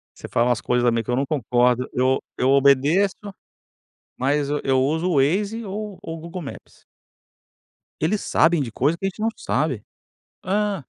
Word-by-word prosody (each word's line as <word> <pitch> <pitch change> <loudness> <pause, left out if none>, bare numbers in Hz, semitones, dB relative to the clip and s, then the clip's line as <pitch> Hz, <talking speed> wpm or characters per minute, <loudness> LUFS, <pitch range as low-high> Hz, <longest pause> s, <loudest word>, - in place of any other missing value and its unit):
Você - - -9
fala 120 +1 +1
umas 115 -6 +1
coisas 125 +3 +1
também 115 -1 +2
que 125 - -4
eu 120 - +2
não 135 - 0
concordo, 125 -2 +1
eu 130 +1 +2
o - - -8 0.2
eu 130 - +2
obedeço. 140 +8 +4 1.0
Mas 140 +2 +1
eu 150 - 0
eu 130 -1 +2
uso 160 +6 0
o 165 - +1
Waze 200 +11 +1
ou 205 0 -6
o 165 - -6
Google 170 +3 -7
Maps. 140 - -11 1.2
Eles 195 +7 0
sabem 165 -1 +3
de 120 -5 -4
coisa 145 +9 +1
que 195 - -5
a 195 - +2
gente 210 - -11
não 225 - +2
sabe. 135 -9 -1 0.6
Hã. 205 +2 0
145 Hz, 180 wpm, -22 LUFS, 130-185 Hz, 1.2 s, obedeço